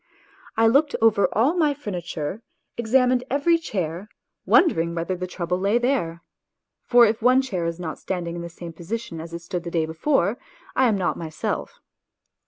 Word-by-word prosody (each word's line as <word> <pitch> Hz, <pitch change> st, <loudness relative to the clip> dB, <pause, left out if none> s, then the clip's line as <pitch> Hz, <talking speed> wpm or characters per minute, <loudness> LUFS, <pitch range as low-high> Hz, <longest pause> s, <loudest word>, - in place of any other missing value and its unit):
I 225 Hz, -, +4 dB
looked 280 Hz, +6 st, +4 dB
over 220 Hz, -3 st, +4 dB
all 255 Hz, +9 st, +3 dB
my 305 Hz, -5 st, +2 dB
furniture, 180 Hz, -, -5 dB, 0.3 s
examined 250 Hz, +2 st, +2 dB
every 330 Hz, +5 st, +3 dB
chair, 185 Hz, -, -4 dB, 0.4 s
wondering 170 Hz, -, +4 dB
whether 170 Hz, +2 st, -2 dB
the 180 Hz, 0 st, -4 dB
trouble 180 Hz, 0 st, -2 dB
lay 200 Hz, +4 st, +2 dB
there 240 Hz, -10 st, -1 dB, 0.6 s
(for 240 Hz, -1 st, +6 dB
if 220 Hz, +1 st, 0 dB
one 255 Hz, +3 st, +5 dB
chair 185 Hz, -10 st, -2 dB
is 170 Hz, +1 st, -4 dB
not 160 Hz, -3 st, -5 dB
standing 175 Hz, -3 st, -4 dB
in 170 Hz, -, -5 dB
the 170 Hz, -, -6 dB
same 170 Hz, 0 st, -9 dB
position 175 Hz, +1 st, -5 dB
as 165 Hz, +1 st, -9 dB
it 170 Hz, 0 st, -7 dB
stood 175 Hz, 0 st, -4 dB
the 170 Hz, -, -5 dB
day 165 Hz, -2 st, 0 dB
before, 195 Hz, -, 0 dB, 0.4 s
I 260 Hz, 0 st, +4 dB
am 215 Hz, -3 st, +2 dB
not 180 Hz, -2 st, -1 dB
myself). 160 Hz, -2 st, -4 dB
195 Hz, 175 wpm, -24 LUFS, 170-245 Hz, 0.6 s, for